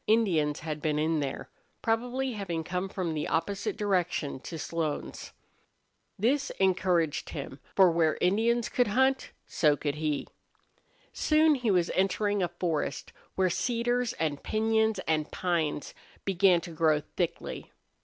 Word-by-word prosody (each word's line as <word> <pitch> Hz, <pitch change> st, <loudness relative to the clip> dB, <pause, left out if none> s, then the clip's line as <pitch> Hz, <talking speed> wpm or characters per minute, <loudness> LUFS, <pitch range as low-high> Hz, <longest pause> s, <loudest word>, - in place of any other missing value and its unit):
Indians 175 Hz, -10 st, +2 dB
had 155 Hz, -1 st, -4 dB
been 150 Hz, -1 st, 0 dB
in 155 Hz, +1 st, +1 dB
there, 140 Hz, -2 st, -4 dB, 0.3 s
probably 245 Hz, +4 st, 0 dB
having 175 Hz, -6 st, -3 dB
come 180 Hz, +3 st, -3 dB
from 180 Hz, -4 st, -2 dB
the 150 Hz, -1 st, -2 dB
opposite 195 Hz, +5 st, -1 dB
direction 180 Hz, -9 st, 0 dB
to 165 Hz, +5 st, -7 dB
Slone's. 160 Hz, -1 st, -4 dB, 0.9 s
This 275 Hz, +7 st, +1 dB
encouraged 180 Hz, -4 st, +1 dB
him, 140 Hz, -1 st, -6 dB, 0.2 s
for 190 Hz, -3 st, +6 dB
where 165 Hz, -2 st, +2 dB
Indians 225 Hz, +6 st, +2 dB
could 250 Hz, -3 st, +1 dB
hunt 265 Hz, +5 st, +2 dB, 0.2 s
so 150 Hz, -2 st, +2 dB
could 145 Hz, 0 st, -2 dB
he. 150 Hz, -2 st, -1 dB, 0.9 s
Soon 310 Hz, 0 st, +4 dB
he 250 Hz, -5 st, -1 dB
was 180 Hz, -3 st, +2 dB
entering 195 Hz, +2 st, +1 dB
a 180 Hz, -, +2 dB
forest 170 Hz, -4 st, -3 dB, 0.2 s
where 185 Hz, -1 st, +2 dB
cedars 240 Hz, +3 st, 0 dB
and 150 Hz, -3 st, -2 dB
piñons 220 Hz, -1 st, +1 dB
and 155 Hz, -1 st, 0 dB
pines 165 Hz, -5 st, -1 dB, 0.3 s
began 185 Hz, -2 st, +4 dB
to 170 Hz, -, -8 dB
grow 155 Hz, -2 st, +2 dB
thickly. 175 Hz, -3 st, -3 dB
180 Hz, 135 wpm, -29 LUFS, 160-220 Hz, 0.9 s, for